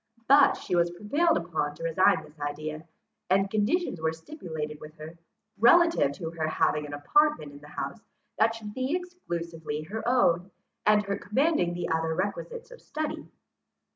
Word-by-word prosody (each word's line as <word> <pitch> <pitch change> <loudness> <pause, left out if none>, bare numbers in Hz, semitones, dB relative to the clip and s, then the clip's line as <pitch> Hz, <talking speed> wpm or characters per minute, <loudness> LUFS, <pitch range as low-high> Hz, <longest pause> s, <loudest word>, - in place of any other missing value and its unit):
But 280 +1 +7
she - - -3
was 170 0 +3
prevailed 285 - +1
upon 160 -4 -2
to 165 - -10
resign 185 +5 +3
this 150 +1 -17
idea, 155 +2 -5 0.4
and 195 +1 +2
conditions 215 - 0
were 160 0 +1
stipulated 160 - -7
with 155 +1 -11
her, 155 +1 -10 0.4
relative 335 - +5
to 160 +2 -6
her 160 -2 -2
having 150 -1 +1
an 145 - -8
apartment 295 - +2
in 145 - -12
the 150 - -14
house 175 +7 -5 0.4
that 225 +1 +3
should 215 -2 -8
be 260 +6 -1
exclusively 170 - -5
her 215 +8 -5
own, 190 -8 +3 0.4
and 210 0 +5
her 200 0 -3
commanding 215 - +1
the 175 -1 -3
other 160 0 0
requisites 475 - -4
of - - -12
study. 310 -1 -4
175 Hz, 165 wpm, -28 LUFS, 160-255 Hz, 0.4 s, But